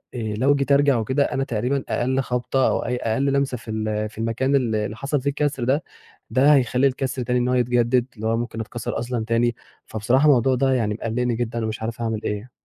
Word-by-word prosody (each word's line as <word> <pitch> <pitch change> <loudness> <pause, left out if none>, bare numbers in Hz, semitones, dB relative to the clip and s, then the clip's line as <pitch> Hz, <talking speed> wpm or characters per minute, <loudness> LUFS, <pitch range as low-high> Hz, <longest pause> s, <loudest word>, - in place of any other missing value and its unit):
آآ 110 -3 -3
لو 140 +4 +3
جيت 140 0 -1
ارجع 140 -2 +4
وكده 130 +6 +1
أنا 135 - -1
تقريبًا 125 +3 -1
أقل 130 +2 0
خبطة 125 +1 0
أو - - 0
أي 125 - -1
أقل 120 +3 -1
لمسة 140 -2 +1
في 110 -1 -9
ال 110 -1 -2
في 110 - -19
المكان 115 +5 0
اللي 110 -5 0
حصل 140 +2 -2
فيه 140 - 0
الكسر 140 -3 -1
ده 135 +5 +1 0.5
ده 135 +6 +5
هيخلي 130 0 +3
الكسر 130 0 -2
تاني 125 +1 0
إن 120 - 0
هو 125 - +1
يتجدد، 120 0 +2
اللي 110 +1 -4
هو 115 0 +1
ممكن 120 -1 -4
اتكسر 115 +1 -4
أصلًا 120 -2 -3
تاني، 115 0 +1 0.3
فبصراحة 125 +6 +1
الموضوع 130 -3 +4
ده 135 +1 +2
يعني 110 -4 0
مقلقني 115 +2 -1
جدًا 115 -1 -2
ومش 110 0 -4
عارف 115 +1 -4
أعمل 115 -2 -2
إيه. 105 +4 -4
125 Hz, 215 wpm, -23 LUFS, 115-135 Hz, 0.5 s, ده